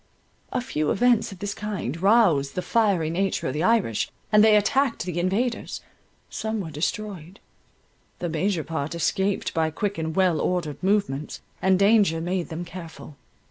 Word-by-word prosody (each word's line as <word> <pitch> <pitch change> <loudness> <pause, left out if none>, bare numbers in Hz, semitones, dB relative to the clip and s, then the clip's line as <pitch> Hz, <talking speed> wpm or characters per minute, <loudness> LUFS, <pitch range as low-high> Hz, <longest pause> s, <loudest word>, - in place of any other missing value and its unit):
A - - -1
few 155 - -2
events 240 0 +2
of 195 - -9
this 200 +2 -4
kind 195 - -4
roused 190 -10 +3
the 180 - -2
fiery 195 -9 +1
nature 190 -4 -1
of - - -3
the 150 - -2
Irish; 190 - +1 0.2
and 210 0 +6
they 220 -1 +6
attacked 235 - +1
the 175 -2 -3
invaders. 215 +7 -1 0.5
Some 220 0 -3
were 165 -5 -5
destroyed; 180 +3 -4 0.8
the 175 - -3
major 170 +1 -1
part 160 0 -4
escaped 190 +4 0
by 160 -2 +1
quick 200 +4 -3
and 160 0 -3
well 185 -5 +2
ordered 170 -6 -2
movements; 190 -7 0 0.2
and 190 0 +4
danger 200 -4 +4
made 175 +1 -2
them 170 +1 -5
careful. 165 -4 -10
185 Hz, 160 wpm, -25 LUFS, 160-210 Hz, 0.8 s, and